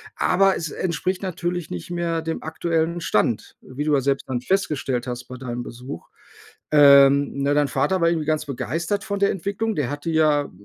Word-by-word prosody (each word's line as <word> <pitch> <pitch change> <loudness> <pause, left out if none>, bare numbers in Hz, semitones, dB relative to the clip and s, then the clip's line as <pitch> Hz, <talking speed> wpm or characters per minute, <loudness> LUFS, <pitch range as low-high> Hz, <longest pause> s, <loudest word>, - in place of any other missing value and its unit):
Aber 195 -1 +3
es 165 - -4
entspricht 185 +3 -2
natürlich 175 -2 -3
nicht 90 -2 -6
mehr 170 -1 -1
dem 160 0 -4
aktuellen 165 +1 -1
Stand, 110 -5 0
wie 130 +3 -6
du 155 - +2
ja 135 - +2
selbst 135 +1 -1
dann 125 -2 -2
festgestellt 135 -7 -1
hast 125 0 -4
bei 125 - -8
deinem 120 -1 -5
Besuch. 120 -7 -9 0.6
Ähm, 140 -1 +6
ne, 140 +1 +2
dein 145 -1 +3
Vater 140 +8 0
war 170 - +4
irgendwie 165 -2 -1
ganz 155 -1 0
begeistert 165 +8 -3
von 200 -1 -3
der 200 - +3
Entwicklung. 205 +4 -2
Der 140 -5 -1
hatte 145 +4 -4
ja, 150 -2 +2
155 Hz, 185 wpm, -23 LUFS, 135-175 Hz, 0.6 s, Ähm